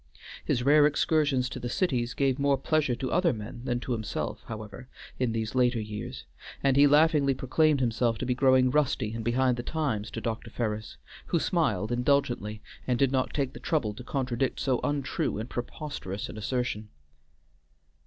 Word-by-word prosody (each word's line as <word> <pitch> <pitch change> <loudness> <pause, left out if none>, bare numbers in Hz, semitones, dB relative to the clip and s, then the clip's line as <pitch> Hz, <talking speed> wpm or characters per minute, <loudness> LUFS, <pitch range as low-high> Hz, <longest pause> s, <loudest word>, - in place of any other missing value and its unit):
His 120 - 0
rare 145 +2 +6
excursions 145 -3 +2
to - - -6
the 120 - -4
cities 125 - 0
gave 135 -1 +1
more 140 0 +3
pleasure 145 -2 +1
to 130 +1 -4
other 180 -1 +3
men 110 +1 -7
than 120 -1 0
to 130 - -5
himself, 110 -3 -3
however, 110 +4 -8 0.3
in 125 -3 +1
these 110 -1 -2
later 125 -2 +2
years, 110 +4 -6 0.4
and 135 -1 +3
he 145 +1 +7
laughingly 145 -2 +4
proclaimed 145 +3 +2
himself 115 -2 +1
to 130 - -3
be 125 - +1
growing 130 0 +4
rusty 130 -7 +1
and 115 0 -4
behind 125 +2 +2
the - - -2
times 125 -7 -2
to - - -5
Dr. 115 0 -4
Ferris, 110 -2 -3 0.3
who 175 - +1
smiled 120 - 0
indulgently, 120 -4 0 0.2
and 125 -2 +2
did 135 +1 +3
not 130 -1 0
take 135 -3 -1
the - - -9
trouble 145 -11 0
to 125 - -10
contradict 130 -1 -1
so 130 -3 +1
untrue 145 -7 -1
and 110 +3 -5
preposterous 120 - -5
an - - -8
assertion. 110 -1 -2
125 Hz, 175 wpm, -28 LUFS, 115-140 Hz, 0.4 s, he